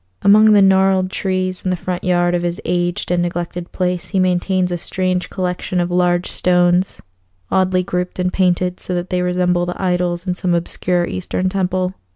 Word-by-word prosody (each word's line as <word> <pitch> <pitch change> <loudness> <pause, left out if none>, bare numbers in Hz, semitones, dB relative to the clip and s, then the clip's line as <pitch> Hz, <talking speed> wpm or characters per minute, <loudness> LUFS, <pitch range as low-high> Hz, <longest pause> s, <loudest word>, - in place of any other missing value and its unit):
Among 215 +2 +6
the 205 -1 +6
gnarled 190 -1 +3
trees 185 -1 -2
in 185 - -1
the 180 - +1
front 180 +1 -4
yard 175 -1 +2
of 175 - 0
his 175 0 -3
aged 175 +1 -1
and 175 0 +2
neglected 175 0 -4
place 180 -2 -2
he 195 - 0
maintains 185 0 +1
a 175 - -1
strange 185 +1 -1
collection 180 -1 -2
of 175 0 -1
large 175 0 +1
stones, 180 +1 +1 0.5
oddly 185 -1 +2
grouped 180 0 -3
and 180 0 -1
painted 180 -1 +1
so 180 - -4
that 175 +1 -4
they 180 0 0
resemble 180 -1 0
the 180 - -5
idols 180 -1 -1
in 180 - -1
some 180 -1 -1
obscure 175 +1 -1
Eastern 185 +1 -2
temple. 185 -1 -1
180 Hz, 185 wpm, -18 LUFS, 175-185 Hz, 0.5 s, Among